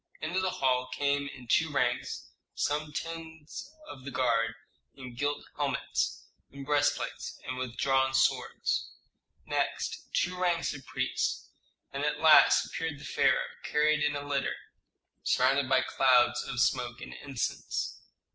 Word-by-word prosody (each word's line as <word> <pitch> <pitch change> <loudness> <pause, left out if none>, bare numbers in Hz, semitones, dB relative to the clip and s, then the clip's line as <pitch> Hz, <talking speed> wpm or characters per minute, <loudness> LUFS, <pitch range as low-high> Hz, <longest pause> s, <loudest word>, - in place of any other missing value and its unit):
Into 170 +4 -1
the 185 0 +1
hall 130 -5 +1
came 140 +1 0
in 130 -3 -10
two 160 +5 +3
ranks 125 -4 -1 0.2
some 150 +1 -1
tens 165 - -7 0.2
of 130 - -10
the 140 - -5
guard 115 -3 +1 0.4
in 130 -3 -9
gilt 145 +3 -2
helmets, 140 -3 -1 0.2
in 140 0 -9
breastplates, 145 +1 0
and 130 - -3
with 125 -2 -4
drawn 135 -1 +2
swords, 135 - +1 0.5
next - - -2
two 180 +1 +1
ranks 175 -2 +1
of 135 -3 -10
priests, - - -1 0.4
and - - -2
at - - 0
last - - +7
appeared 160 -3 -4
the - - -10
pharaoh, - - +2
carried 155 +1 +2
in 145 0 +1
a 145 0 -5
litter, 140 -2 0 0.7
surrounded 130 +1 +2
by 130 -1 +4
clouds 125 -2 +4
of 135 -3 -3
smoke 125 -2 +1
and - - -8
incense. 135 -3 -3
140 Hz, 140 wpm, -30 LUFS, 130-150 Hz, 0.7 s, last